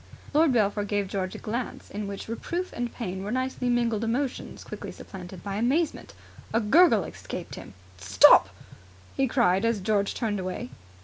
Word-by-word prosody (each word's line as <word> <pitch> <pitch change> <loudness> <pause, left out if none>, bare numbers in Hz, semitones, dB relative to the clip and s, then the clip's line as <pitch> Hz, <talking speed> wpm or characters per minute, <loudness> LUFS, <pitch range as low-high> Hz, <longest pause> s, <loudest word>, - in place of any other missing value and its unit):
Lord 310 0 +5
Belpher 210 -3 +2
gave 205 -1 -1
George 185 -1 -3
a - - -5
glance 235 +3 -5
in 205 0 -4
which 200 0 -6
reproof 345 +11 -4
and 240 -1 -3
pain 190 -5 -5
were 200 - -4
nicely 255 +1 -1
mingled 235 -2 +1
emotions 245 +4 -2
quickly - - -7
supplanted 180 -2 -10
by 200 -1 -3
amazement. 275 +9 0 0.4
A - - +5
gurgle 230 - +5
escaped - - -7
him. - - -10 0.2
"Stop!" 100 +1 +6 0.7
he 270 - +2
cried 215 -6 +2
as 230 -2 +1
George 200 +1 0
turned 215 -4 -1
away. 185 -8 -5
215 Hz, 165 wpm, -27 LUFS, 195-245 Hz, 0.7 s, Stop